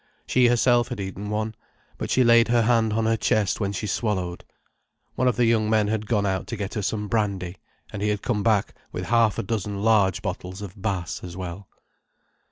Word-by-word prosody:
She 125 -1 +4
herself 120 0 +3
had 125 -4 -6
eaten 100 +1 -5
one, 110 +1 -2 0.5
but - - -3
she 130 - +4
laid 115 -1 +6
her 120 -1 +3
hand 115 -1 +3
on 110 +1 0
her 115 0 +3
chest 105 -3 +1
when 100 -2 -1
she 105 - -4
swallowed. 95 -5 -2 0.7
One 130 - +1
of 125 - +2
the 120 +1 +3
young 110 -2 +2
men 110 -2 +2
had 110 -1 -2
gone 105 -4 +1
out 95 -1 -1
to 115 - -4
get 100 -1 -4
her 105 - -2
some 105 +1 -2
brandy, 100 -5 -1 0.4
and 105 - -5
he 105 - +1
had 105 -1 -2
come 115 -5 0
back 105 -2 +1 0.2
with - - -4
half 115 -3 +4
a - - -1
dozen 100 -1 -3
large 105 -4 +3
bottles 95 0 -5
of 100 0 -9
Bass 95 -5 -3
as 90 0 -8
well. 90 +1 -7
105 Hz, 210 wpm, -24 LUFS, 100-115 Hz, 0.7 s, laid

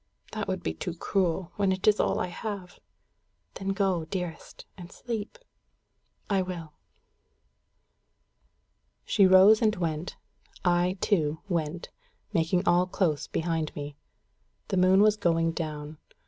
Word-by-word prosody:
"That - - -4
would - - -3
be 80 - -2
too 165 - -5
cruel, 180 -1 -1
when 200 -2 +2
it 190 +2 -2
is 210 -1 +5
all - - +1
I - - 0
have." 195 -1 -6 0.7
"Then 195 - -7
go, 195 -4 0
dearest, 175 -1 -6
and 175 -2 -11
sleep." 230 - -5 0.9
"I 195 -2 +1
will." 170 -4 -6 2.3
She 195 -3 +4
rose 190 +4 +7
and 215 -1 +3
went. 165 -2 -3 0.5
I, 175 +1 +2
too, 160 -6 +1
went, 170 -2 -3 0.4
making 175 +3 +1
all 175 +1 +4
close 165 -6 0
behind 165 -2 -2
me. 145 -1 -6 0.7
The 195 - 0
moon 185 +2 +5
was 215 0 +4
going 165 -4 +1
down. 155 -2 -5
180 Hz, 130 wpm, -28 LUFS, 165-195 Hz, 2.3 s, rose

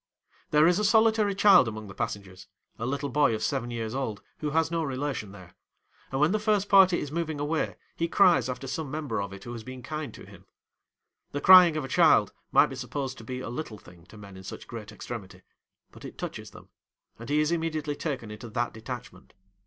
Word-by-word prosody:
There 150 +1 +5
is 175 +3 +4
a - - 0
solitary 220 -1 +3
child 195 - +6
among 110 -1 -6
the 100 - -10
passengers—a 95 +3 -7
little 140 +1 -2
boy 140 -3 +3
of 110 - -4
seven 120 0 -1
years 115 -1 -4
old 120 -6 -4 0.2
who 150 - -2
has 160 +2 +1
no 165 -1 0
relation 135 -6 -3
there; 90 -3 -13 0.6
and 135 - -2
when 150 +3 +4
the 215 - +1
first 210 -2 +1
party 190 -2 +6
is 145 - -5
moving 160 -2 -3
away 150 +2 -1 0.2
he 170 - -1
cries 180 -7 +4
after 125 +2 -5
some 140 +2 -4
member 150 -7 -3
of 100 -1 -5
it 100 0 -10
who 120 - -8
has 115 -2 -7
been 130 0 -9
kind 155 +1 -5
to - - -12
him. - - -16 0.9
The 145 - -1
crying 180 -3 +8
of 150 - -2
a - - -6
child - - +4 0.2
might - - +6
be - - -5
supposed 130 +1 -5
to - - -10
be 125 +3 -5
a - - -6
little 120 -3 -6
thing 90 -3 -17
to 110 - -14
men 100 -2 -12
in 95 - -11
such 95 - -9
great 110 -3 -8
extremity; 100 -3 -8 0.5
but - - -15
it - - -9
touches - - -6
them, - - -15 0.5
and 115 - -9
he 150 +1 +2
is 155 +1 +1
immediately 155 -3 -2
taken 130 -10 -4
into 110 +2 -9
that 120 +2 -2
detachment. 115 +2 -9
135 Hz, 215 wpm, -27 LUFS, 110-160 Hz, 0.9 s, crying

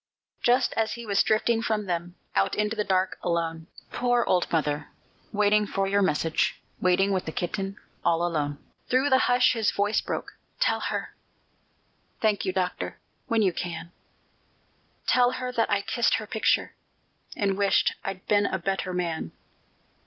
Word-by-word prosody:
Just 245 +1 +3
as 225 -1 0
he 235 0 -7
was 200 -2 +3
drifting 225 +1 +2
from 220 -2 -1
them, 175 -1 -3 0.2
Out 95 0 +2
into 210 +1 0
the 210 - 0
dark, 185 -1 0
alone 165 -2 -2 0.2
(Poor 245 -1 +2
old 180 -1 +1
mother, 150 -2 0 0.4
waiting 210 0 +3
for 195 0 0
your 200 +1 +2
message, 160 -3 +1 0.2
Waiting 185 +2 +3
with 185 -2 0
the 160 - -4
kitten, 195 +4 -3 0.3
all 170 +1 +2
alone!), 145 -4 -1 0.3
Through 260 +3 +2
the 260 - +6
hush 250 0 +5
his 225 -3 +1
voice 205 +2 +1
broke, - - -4 0.3
"Tell - - +2
her - - -3 1.1
Thank 215 -2 +1
you, - - +1
Doctor 185 -1 -2 0.3
when 230 -4 +2
you 185 -3 +2
can, 170 0 -5 1.1
Tell 250 0 +4
her 255 0 -3
that 230 -2 +1
I 200 0 +1
kissed 235 +2 +2
her 220 - -3
picture, 220 +1 +1 0.6
And 195 -2 +1
wished 200 0 +3
I'd 195 -1 -5
been 205 -1 +3
a - - -1
better 190 0 -2
man." 165 - -2
200 Hz, 160 wpm, -26 LUFS, 175-220 Hz, 1.1 s, the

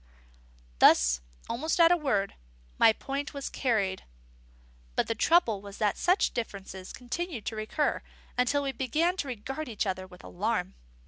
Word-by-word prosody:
Thus, - - +6 0.3
almost 310 +9 -1
at 335 0 +7
a - - +7
word, 250 - 0 0.5
my 225 - +8
point 275 +5 -4
was 280 - -4
carried. 205 -7 0 0.9
But - - +2
the - - +1
trouble 230 - +3
was 200 0 -10
that 210 -2 +1
such 365 +3 +2
differences 195 -5 -5
continued 255 - -5
to 225 - -3
recur, 215 +8 -1 0.3
until 280 +3 +2
we 275 - -1
began 300 +8 0
to 285 - -2
regard 265 +5 -5
each 220 -1 -2
other 185 -1 -3
with 180 -1 -15
alarm. 90 -7 -2
240 Hz, 150 wpm, -29 LUFS, 200-285 Hz, 0.9 s, my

